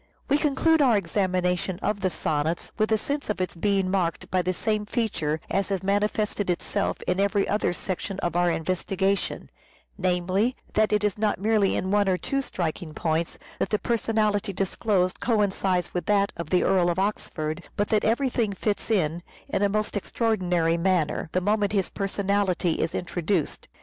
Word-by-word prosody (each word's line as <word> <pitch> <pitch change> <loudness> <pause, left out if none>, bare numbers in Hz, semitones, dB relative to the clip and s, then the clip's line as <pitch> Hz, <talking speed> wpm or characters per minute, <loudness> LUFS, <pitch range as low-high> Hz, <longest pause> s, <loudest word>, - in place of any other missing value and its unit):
We 285 +2 +4
conclude 315 +2 +3
our 245 -6 +5
examination 180 -1 0
of 205 -1 0
the 190 - +2
sonnets 155 0 -2
with 215 0 0
a 220 - +5
sense 285 +5 -3
of 210 - -1
its 185 - -1
being 195 +1 +1
marked 180 -4 -1
by 185 - +3
the 180 +1 0
same 215 +3 -1
feature 160 -10 -1
as 195 +1 0
has 195 -1 -1
manifested 205 0 0
itself 195 +3 -1
in 180 +1 0
every 200 0 +2
other 205 -3 +1
section 185 +2 -4
of 175 - -1
our 175 0 +3
investigation: 190 +4 -1 0.5
namely, 185 +6 +1 0.2
that 215 0 +3
it 210 0 +2
is 210 0 0
not 215 -1 +1
merely 210 -1 +2
in 190 - -1
one 205 -1 +3
or 185 - +2
two 275 +8 -1
striking 170 - -4
points 160 +1 -1 0.2
that - - 0
the 210 - +2
personality 215 -3 0
disclosed 190 -1 0
coincides 195 -5 +1
with 180 - -3
that 200 -1 +3
of 170 -2 -6
the 180 - +3
Earl 180 -2 +3
of 175 - -1
Oxford; 175 -5 -2 0.2
but 205 - +1
that 215 - +2
everything 235 -2 +1
fits 205 +2 -2
in, 170 -6 +1 0.3
in - - 0
a 205 - +3
most 215 +1 -1
extraordinary 180 -6 +1
manner, 170 -3 0
the 185 - +1
moment 205 +1 +1
his 195 -3 0
personality 195 -3 0
is 160 - -1
introduced. 175 -1 -2
195 Hz, 175 wpm, -26 LUFS, 180-210 Hz, 0.5 s, our